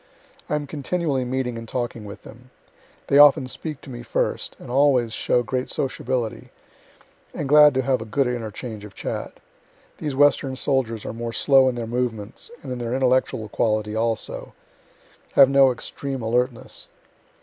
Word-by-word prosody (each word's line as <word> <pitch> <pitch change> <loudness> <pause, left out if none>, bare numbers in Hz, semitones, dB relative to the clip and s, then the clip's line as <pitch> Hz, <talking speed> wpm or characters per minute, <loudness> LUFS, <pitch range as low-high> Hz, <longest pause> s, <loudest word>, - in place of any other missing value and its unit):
I - - +1
am 150 -1 -2
continually 145 -1 -2
meeting 125 -2 -2
and 115 - -9
talking 120 -3 -3
with 100 0 -10
them. 125 +2 -14 0.6
They 140 - +4
often 145 -1 +7
speak 150 +3 -6
to - - -12
me 120 -1 -7
first, - - -2
and - - -10
always 130 -4 +3
show 120 - +1
great 125 +3 -3
sociability, 125 -2 -3 0.9
and 145 - -3
glad 150 0 +7
to 130 - +1
have 130 -2 +1
a - - -5
good 130 +5 +1
interchange 115 -2 -5
of 105 -2 -11
chat. - - -5 0.7
These 145 -3 -3
Western 140 -1 +3
soldiers 125 -5 -1
are - - -4
more 115 0 -5
slow 135 0 +5
in 125 - -3
their 120 -1 -3
movements, 115 -3 -3
and 135 - -6
in 125 - -4
their 120 +1 -2
intellectual 130 -3 +1
quality 105 0 0
also; 115 0 -3 0.8
have 135 -1 +7
no 135 -1 +6
extreme 135 +1 -5
alertness. 120 +2 -2
125 Hz, 160 wpm, -23 LUFS, 115-135 Hz, 0.9 s, often